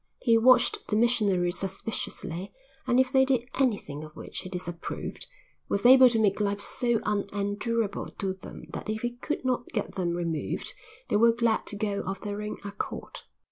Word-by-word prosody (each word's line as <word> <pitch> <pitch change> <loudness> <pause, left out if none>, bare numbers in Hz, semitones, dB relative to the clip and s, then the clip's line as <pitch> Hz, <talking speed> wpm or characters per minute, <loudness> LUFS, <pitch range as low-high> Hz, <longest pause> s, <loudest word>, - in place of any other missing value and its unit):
He 230 -2 +5
watched 250 +2 +4
the 210 - 0
missionaries 205 -6 +2
suspiciously 190 -2 -4 0.4
and, 250 0 +4
if 260 -1 +3
they 265 0 +5
did 255 -3 +1
anything 205 - 0
of 155 0 -11
which - - -7
he 185 - -7
disapproved, 175 -2 -5 0.4
was 200 +3 -1
able 255 0 +9
to 230 - +1
make 210 -2 +2
life 200 0 0
so 240 +2 +1
unendurable 205 +2 -1
to 190 -1 -1
them 190 - -11
that - - -5
if 215 +1 -2
he 240 - 0
could 295 +1 -3
not 250 -1 0
get 210 - -3
them 175 -3 -1
removed 170 -3 -3 0.4
they - - +3
were 230 +2 +6
glad 230 -1 +1
to - - -5
go 205 -1 -1
of 195 0 -4
their 205 0 -4
own 210 0 -4
accord. 200 0 -5
210 Hz, 180 wpm, -28 LUFS, 195-235 Hz, 0.4 s, able